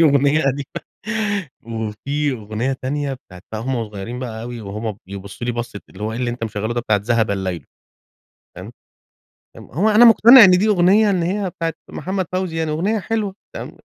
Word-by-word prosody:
دي - - +7
أغنية 145 0 +4
قديمة 140 0 -3 0.8
وفي 115 +6 -2
أغنية 110 +3 -3
تانية 140 +1 -2
بتاعة 90 -8 -15
بقى 110 - -3
وهمَّ 125 -2 -2
صغيرين 105 +4 -6
بقى 115 -3 -5
أوي، 120 -1 -6
وهمَّ 105 +1 -5
بيبصوا 100 +4 -7
لي 120 - 0
بصة 120 -3 -5
اللي - - -11
هو 110 +1 -2
إيه 115 - -4
اللي 125 -1 -1
أنت 120 -1 -4
مشغله 110 +1 -3
ده 120 - 0
بتاعة 105 -3 +1
ذهب 115 -3 +2
الليل 95 -6 -3 0.9
تمام، - - -8 0.9
امم - - -11
هو 185 - 0
أنا 220 +3 +7
مقتنع 235 +1 +9
إن 185 - +7
دي 185 +4 +4
أغنية 200 +2 +4
إن 180 -3 +1
هي 190 +2 -1
بتاعة 165 -1 -3 0.2
محمد 190 0 -3
فوزي 185 -3 -2
يعني 160 -1 -1
أغنية 195 +8 0
حلوة 205 -1 -2 0.2
تمام، - - -7
130 Hz, 185 wpm, -20 LUFS, 110-180 Hz, 0.9 s, مقتنع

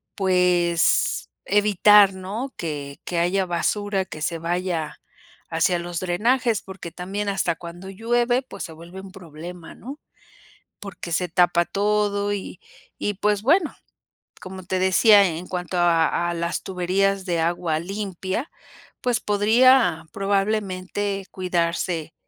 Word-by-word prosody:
pues 180 -3 +2
evitar, 205 -1 +5
¿no?, 205 +8 -5
que 145 -4 -5
que 175 -1 -1
haya 185 +2 +1
basura 195 +3 0
que 155 - -9
se 165 +1 -1
vaya 170 -1 -3 0.5
hacia 170 +2 +1
los 170 -1 -4
drenajes, 225 +5 +1
porque 190 -3 -9
también 200 +4 -4
hasta 190 -4 0
cuando 175 +3 -9
llueve, 240 +5 +1
pues - - -8
se 165 - -10
vuelve 170 +4 -11
un 190 -1 -11
problema, 170 -1 -10
¿no? 275 +7 -9 0.8
Porque 185 -4 -8
se 180 +2 0
tapa 175 0 +3
todo 205 0 0
y 190 -2 -6 0.4
y 205 - -1
pues 205 +1 0
bueno, 315 - +2 0.7
como 185 0 -8
te 185 +1 -2
decía, 200 +2 +6
en 175 0 -3
cuanto 180 0 -4
a 170 0 +2
a 175 - -2
las 170 0 -2
tuberías 190 +1 0
de 175 -3 -1
agua 165 -1 0
limpia, 195 - -4 0.5
pues 245 -3 +1
podría 220 -1 +4
probablemente 195 -1 -1
cuidarse 170 -3 -2
185 Hz, 130 wpm, -23 LUFS, 175-205 Hz, 0.8 s, decía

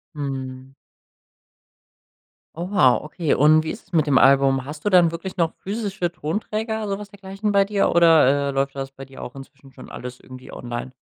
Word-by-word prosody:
Mhm. 135 -2 -6 1.8
Oh, 175 +2 -5
wow, 130 -11 +4
okay, 155 0 -1
und 155 +2 +4
wie 160 - -3
ist 215 - -11
es 190 - -31
mit 155 -2 +3
dem 135 -3 +3
Album? 135 -1 +4
Hast 150 +5 -9
du 205 - +1
dann 175 -2 +6
wirklich 185 +3 -7
noch 165 -2 +1
physische 200 -3 -3
Tonträger, 215 +6 -3
so 195 0 -3
was 205 - -9
dergleichen 195 +1 -4
bei 200 -1 +4
dir 200 0 +1
oder, 150 -5 +4
äh, - - -1
läuft 135 0 -1
das 135 0 -5
bei 135 0 -11
dir 135 0 -11
auch 125 - -8
inzwischen 135 0 -13
schon - - -13
alles 125 0 -8
irgendwie 130 0 -12
online? 120 +1 -6
155 Hz, 190 wpm, -22 LUFS, 135-195 Hz, 1.8 s, dann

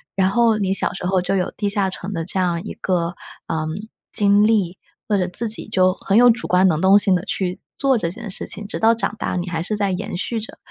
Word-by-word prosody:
然 190 -1 +3
后 230 +1 +3
你 195 -2 0
小 - - 0
时 185 - -6
候 185 0 +2
就 195 +2 -1
有 180 - 0
地 205 -1 -1
下 200 -1 0
城 190 +1 -6
的 165 -3 -3
这 190 +2 -3
样 175 -2 0
一 - - -6
个， 175 -2 -1 0.3
嗯， 160 +7 -3 0.2
经 205 0 +4
历， 200 -5 +1 0.3
或 210 - +2
者 180 -2 0
自 220 +6 -2
己 220 - -2
就 185 -3 +3
很 200 0 0
有 245 +1 +7
主 235 +1 +1
观 180 +1 +4
能 160 -3 +1
动 195 +2 +6
性 195 -2 +3
地 180 - -1
去 180 -2 -2 0.2
做 270 -3 +3
这 170 - -1
件 205 +4 -8
事 185 - -6
情， 210 - -7
直 - - -4
到 225 +1 +5
长 230 -2 -2
大 205 - -2
你 175 +1 -3
还 165 -2 -2
是 210 +4 -3
在 200 -2 0
延 180 - -4
续 225 +5 -2
着 220 - -10
195 Hz, 275 characters per minute, -21 LUFS, 180-210 Hz, 0.3 s, 有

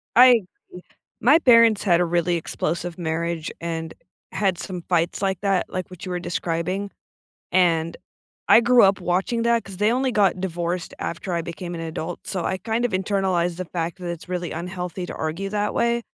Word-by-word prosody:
I 250 +2 +9 0.4
ee 180 - -9 0.4
my 285 +8 +6
parents 230 -7 +5
had 175 -4 +4
a - - +3
really 175 +1 +1
explosive 170 +1 -3
marriage 165 0 -2
and 165 -1 -4 0.4
had 190 -4 0
some 180 -3 -6
fights 170 0 +1
like 190 -3 0
that, 195 -2 +1
like 185 -1 -4
what 185 -1 -10
you 185 - -5
were 180 - -2
describing, 180 +3 -2 0.6
and 165 -3 +2 0.5
I - - +8
grew 240 +1 +5
up 195 0 +3
watching 190 +7 0
that, 235 0 +2
'cause 195 -1 -9
they 210 +2 +3
only 260 +1 +1
got 200 -3 +2
divorced 175 -1 -3
after 170 +2 -4
I 170 - -1
became 175 +1 -6
an 165 - -5
adult, 165 +1 -5
so 185 -4 -3
I 190 - 0
kind 225 +5 -1
of 245 - 0
internalized 185 -2 0
the 185 - -3
fact 165 +1 -4
that 180 -1 -6
it's 170 0 -7
really 180 -1 -3
unhealthy 180 +1 -5
to - - -7
argue 165 +5 -3
that 210 0 -1
way. 235 0 +1
180 Hz, 190 wpm, -23 LUFS, 170-200 Hz, 0.6 s, I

